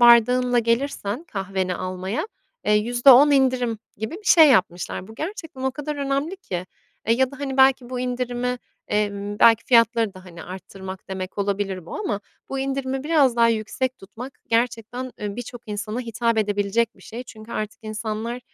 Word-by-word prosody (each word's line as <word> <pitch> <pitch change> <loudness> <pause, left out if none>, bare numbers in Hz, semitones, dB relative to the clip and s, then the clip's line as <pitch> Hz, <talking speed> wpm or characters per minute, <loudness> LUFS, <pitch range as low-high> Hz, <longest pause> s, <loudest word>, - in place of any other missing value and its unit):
bardağınla 245 +1 +6
gelirsen 235 +2 -1
kahveni 190 - -2
almaya, 185 - -3 0.4
eee, 210 - +3
%10 245 +6 +6
indirim 255 -4 +2 0.2
gibi 220 +8 -4
bir 415 +4 -10
şey 320 -6 +8
yapmışlar. 185 -4 +1
Bu 220 - -11
gerçekten 320 - -6
o 265 - +1
kadar 295 +2 -5
önemli 280 +6 -1
ki, 180 - -5 0.4
eee, 230 - +4
ya 260 +1 +2
da, 280 - -11
hani, 270 -2 -3
belki 265 -2 +4
bu 250 -1 -3
indirimi, 250 0 -2 0.3
emm, 205 0 -1
belki 230 0 +6
fiyatları 230 -3 +4
da, 185 0 -12
hani, 170 -2 -10
arttırmak 190 +1 -9
demek 190 +1 -5
olabilir 195 -3 -2
bu - - -7
ama 335 - -2 0.3
bu 270 - -3
indirimi 270 0 -2
biraz 290 -6 +3
daha 230 0 +5
yüksek 230 +4 -1
tutmak 225 +7 -9 0.2
gerçekten, 235 +2 -1
eee, 205 0 -4
birçok 245 0 -7
insana 215 +3 -3
hitap 230 -1 0
edebilecek 205 +2 0
bir - - -18
şey. 240 +3 -7
Çünkü 220 -1 -12
artık 215 0 -4
insanlar, 220 +2 -4
235 Hz, 165 wpm, -23 LUFS, 205-260 Hz, 0.4 s, şey